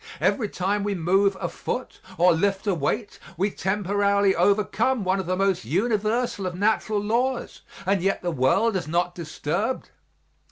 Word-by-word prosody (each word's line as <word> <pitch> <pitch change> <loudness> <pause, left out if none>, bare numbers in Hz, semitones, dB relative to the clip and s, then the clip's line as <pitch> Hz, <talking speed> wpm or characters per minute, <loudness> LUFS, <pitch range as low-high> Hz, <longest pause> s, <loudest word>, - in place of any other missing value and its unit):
Every 220 -6 +1
time 200 +3 -1
we 205 -1 -1
move 190 +3 +2
a - - -2
foot 255 - -5 0.2
or 180 +1 +5
lift 195 +4 0
a 200 - +2
weight 200 - -2 0.2
we 195 +4 +1
temporarily 200 0 +1
overcome 215 +4 +2
one 190 +1 +1
of 190 - -4
the 185 - +1
most 195 -1 +1
universal 215 - 0
of 180 - -4
natural 215 +2 +1
laws 240 +5 -1 0.2
and 195 -1 +1
yet 195 +1 0
the 175 - 0
world 180 - +2
is 180 -5 -2
not 175 +2 0
disturbed. 175 - -3
195 Hz, 160 wpm, -24 LUFS, 180-210 Hz, 0.2 s, or